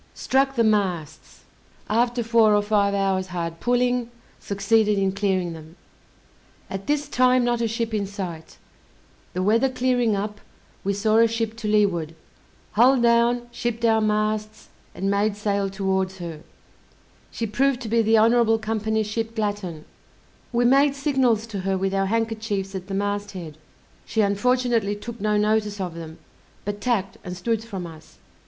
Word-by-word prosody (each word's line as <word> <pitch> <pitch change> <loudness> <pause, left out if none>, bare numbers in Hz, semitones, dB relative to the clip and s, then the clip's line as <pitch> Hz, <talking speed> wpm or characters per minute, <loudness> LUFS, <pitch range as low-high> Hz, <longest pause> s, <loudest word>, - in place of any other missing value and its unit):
Struck 270 +1 +1
the 235 - +3
masts: 180 -8 -1 0.4
after 240 +2 +1
four 225 -2 +4
or 205 - +2
five 205 -1 +2
hours 190 -1 0
hard 170 -2 -4
pulling, 245 0 +1 0.3
succeeded 205 +1 +1
in 195 -1 +1
clearing 190 -3 -1
them. 160 0 -12 1.0
At 195 0 -5
this 295 0 0
time 255 0 +3
not 240 -1 0
a 230 - +1
ship 225 0 -3
in 205 -2 -1
sight; 180 -5 -7 0.8
the 185 - -1
weather 230 +6 +3
clearing 250 -3 +1
up, 205 +1 -4 0.4
we 200 - 0
saw 215 +2 +2
a 230 0 +6
ship 225 -1 -2
to 225 -2 -4
leeward, 190 -7 +1 0.6
hull 250 +5 +5
down, 235 +1 +3
shipped 235 -1 -2
our 220 -1 +4
masts, 215 0 -1 0.3
and 195 +1 -1
made 205 +1 +1
sail 200 -1 0
towards 190 -1 -1
her; 165 -4 -7 0.9
she 230 - -4
proved 255 +4 +1
to 235 - -5
be 230 +1 +2
the 225 0 +4
Honourable 225 0 +4
Company's 220 0 -1
ship 225 +2 -3
Glatton. 205 -7 -3 0.7
We 240 0 +2
made 275 +3 +4
signals 265 -6 +1
to 215 -4 -6
her 190 0 -1
with 195 +1 -1
our 195 0 +1
handkerchiefs 220 -3 -2
at 190 -1 -6
the 195 - -4
mast 205 +1 -2
head, 165 -5 -7 0.5
she 220 - +1
unfortunately 225 +1 +1
took 230 +2 -8
no 210 0 +1
notice 210 -1 +1
of 180 -3 -3
them, 165 -1 -9 0.5
but 205 0 -4
tacked 205 -5 -1
and 180 0 -6
stood 225 +4 -1
from 195 -6 -6
us. 160 -1 -13
210 Hz, 160 wpm, -24 LUFS, 195-230 Hz, 1.0 s, a